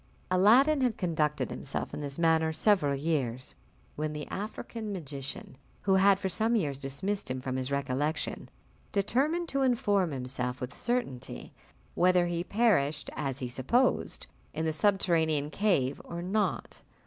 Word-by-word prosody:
Aladdin 250 +11 +5
had 245 -4 +1
conducted 155 -4 0
himself 135 - -4
in - - -4
this 140 -1 -4
manner 160 -1 +3
several 160 -4 +3
years, 135 -5 -1 0.4
when 155 0 -2
the 150 -1 -5
African 215 +1 -5
magician, 140 -7 -6 0.2
who 195 - +3
had 195 +1 +5
for 195 - -2
some 220 +6 +1
years 145 -10 0
dismissed 150 +8 -3
him 130 0 -2
from 130 0 -3
his 130 0 -2
recollection, 140 +3 -2 0.4
determined 280 - +1
to 275 - 0
inform 215 -8 +2
himself 125 -2 -3
with 125 +1 -5
certainty 235 - -3 0.4
whether 180 0 +4
he 170 0 -1
perished, 175 -10 +1
as 135 -3 -2
he 130 - -3
supposed, 135 - +1 0.3
in 160 +1 -1
the 160 - 0
subterranean 160 -6 +2
cave 150 -11 +1
or 170 0 -6
not. 205 +4 -1
165 Hz, 145 wpm, -30 LUFS, 140-205 Hz, 0.4 s, Aladdin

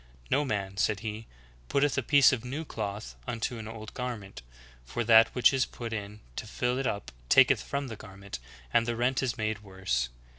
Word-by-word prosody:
"No 145 - +4
man," 100 -7 -2
said 100 +1 +1
He, 110 0 -5 0.4
"putteth 145 +1 +2
a 140 - +2
piece 140 +2 +6
of 120 -3 -2
new 140 +6 -4
cloth 105 -4 -5
unto 120 0 -2
an 110 - -7
old 110 -1 -8
garment, 115 - -5 0.4
for 65 - -3
that 115 0 +8
which 125 0 +5
is 130 -1 +2
put 115 -2 -6
in 105 0 -5 0.2
to 115 - -4
fill 125 +4 -1
it 135 - 0
up 100 - -3 0.2
taketh 130 -3 +6
from 140 0 -3
the 115 - -6
garment, 100 - -9 0.3
and 115 0 +4
the 120 - 0
rent 125 +2 +1
is 130 -3 -1
made 110 -1 -1
worse. 95 - -1
115 Hz, 195 wpm, -29 LUFS, 105-125 Hz, 0.4 s, that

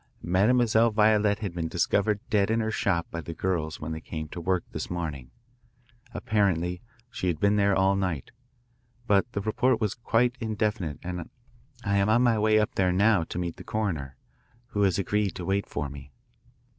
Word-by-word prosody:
Mademoiselle 110 +5 +3
Violette 105 -1 +3
had 100 -5 -3
been 85 -1 -2
discovered 100 +5 +1
dead 100 -1 +3
in 115 +1 +2
her 110 0 -1
shop 90 -6 0
by 85 - -4
the 85 +1 -7
girls 80 -5 -2
when 80 +1 -5
they 80 0 -5
came 80 -1 -6
to 85 - -7
work 90 0 0
this - - -5
morning. 75 -7 -4 0.8
Apparently 90 -6 0 0.3
she 90 - -3
had 85 -4 0
been 100 +2 +3
there 100 -1 +3
all 95 +1 +3
night, 90 -8 -2 0.7
but 105 +1 +2
the 100 - -2
report 115 +3 +1
was 105 -3 0
quite 120 +1 +1
indefinite 105 - -2
and 90 -2 -5 0.5
I 100 -1 +1
am 100 +1 +2
on 120 +3 +4
my 115 -3 +3
way 110 0 +4
up 105 -1 +1
there 90 -2 +2
now 100 0 +3
to - - -7
meet 85 -2 -3
the - - -9
coroner, 80 -12 -3 0.5
who 105 - -1
has 95 -3 +3
agreed 100 +1 0
to 90 - -5
wait 100 +2 0
for 75 - -3
me." 70 0 -10
100 Hz, 185 wpm, -27 LUFS, 85-110 Hz, 0.8 s, on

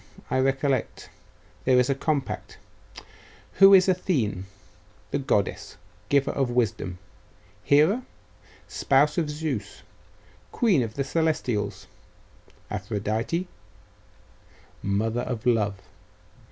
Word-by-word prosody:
I 130 - +2
recollect. 135 -1 -1 0.5
There 130 -1 +4
is 125 - +3
a 140 - +2
compact.... 140 0 -3 1.0
Who 195 0 +9
is 185 0 +5
Athene? 125 - 0 0.6
The 140 - 0
goddess, 130 -7 -1 0.3
giver 140 -1 +2
of 135 -3 -1
wisdom. 110 -7 -1 0.7
Hera, 160 - +3 0.6
spouse 145 +4 +2
of 155 -3 -1
Zeus, 150 -9 -4 0.7
queen 205 - +2
of 110 -2 -4
the 140 - -1
Celestials. 155 -9 -1 0.9
Aphrodite, 110 - -2 1.3
mother 110 +4 -1
of 125 -2 -5
love.... 110 -5 +2
130 Hz, 95 wpm, -25 LUFS, 110-150 Hz, 1.3 s, Who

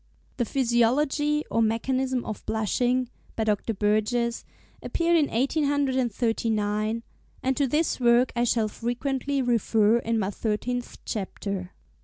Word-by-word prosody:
'The 240 - +1
Physiology 275 +5 +1
or 230 - +2
Mechanism 255 +3 0
of 215 - -6
Blushing,' 245 +4 +1 0.3
by 225 - 0
Dr. 215 +1 0
Burgess, 215 +4 +1 0.4
appeared 340 0 +1
in 305 -3 +4
1839, 230 -6 0 0.4
and 265 0 +1
to 280 0 +1
this 300 +4 0
work 240 +1 +4
I 240 - +2
shall 230 -2 +2
frequently 265 +5 -2
refer 225 -2 +3
in 230 -1 -1
my 200 -2 0
thirteenth 240 +4 -3
Chapter. 195 -2 -4
240 Hz, 120 wpm, -26 LUFS, 220-265 Hz, 0.4 s, in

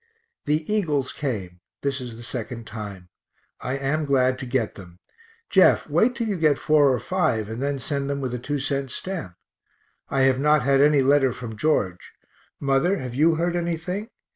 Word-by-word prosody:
The 155 +1 0
Eagles 150 -11 0
came; 100 -11 -4 0.2
this 140 -1 -1
is 120 -2 -7
the 120 - -10
second 115 0 -6
time; 100 -5 -8 0.5
I 130 +2 -3
am 140 +3 -1
glad 130 -2 +2
to 130 - -6
get 120 -3 0
them 90 -3 -13 0.5
Jeff, - - +5
wait 250 +2 +2
till 230 - -2
you 200 -3 -1
get 155 -4 +3
four 150 -3 +4
or 125 - +1
five, 155 - 0
and 115 +3 -5
then 140 0 -1
send 140 +1 -3
them 140 0 -1
with 130 -3 -3
a 125 - -3
two 145 +4 -2
cent 135 0 -2
stamp. 145 - -5 0.7
I 135 - +1
have 130 -1 +3
not 150 -1 +3
had 135 +1 +3
any 145 -1 +5
letter 135 -1 +4
from 115 -3 -7
George. 105 - -1 0.5
Mother, 140 +8 +2
have 125 -6 -5
you 160 +5 +3
heard 170 +2 0
anything? 175 +5 -3
135 Hz, 185 wpm, -24 LUFS, 125-155 Hz, 0.7 s, Jeff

